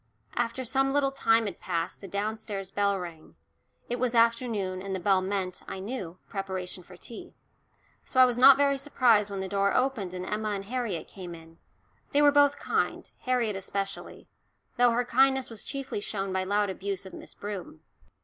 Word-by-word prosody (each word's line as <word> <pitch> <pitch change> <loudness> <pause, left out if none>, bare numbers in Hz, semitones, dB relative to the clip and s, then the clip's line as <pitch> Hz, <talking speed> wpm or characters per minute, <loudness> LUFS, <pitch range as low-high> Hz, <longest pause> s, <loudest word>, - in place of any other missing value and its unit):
After 240 +2 -1
some 270 +3 +2
little 280 -1 +2
time 225 -4 +3
had 195 -4 -5
passed 170 -2 -3
the 195 - -8
downstairs 205 0 -3
bell 200 -1 +1
rang 165 - -9 0.5
it 245 +1 -2
was 250 -1 0
afternoon, 230 -5 +2
and 195 0 -3
the - - -2
bell 190 +1 +3
meant, 185 -1 -2
I 190 - -5
knew, 190 -4 -5
preparation 190 -2 -4
for 180 +1 -14
tea. 230 - -10 0.7
So 260 - -1
I 255 - +10
was 245 -1 0
not 270 +1 +9
very 280 -1 +3
surprised 240 -7 +3
when 195 -1 -4
the 190 - -3
door 200 +1 +1
opened 230 -9 0
and 180 0 -4
Emma 210 +1 -1
and 195 -1 -4
Harriet 230 -6 -3
came 180 -3 -8
in 165 0 -15 0.5
they 290 - +5
were 290 - +7
both 285 0 +5
kind, - - -1
Harriet 245 -5 +1
especially, 195 +1 -5 0.5
though 245 0 +5
her 240 +1 +1
kindness 265 +1 +3
was 225 - -5
chiefly 275 -6 -4
shown 195 -2 -3
by 190 0 +1
loud 205 0 +1
abuse 195 0 -4
of 190 - -10
Miss - - -10
Broom. 195 -6 -7
205 Hz, 185 wpm, -28 LUFS, 190-245 Hz, 0.7 s, I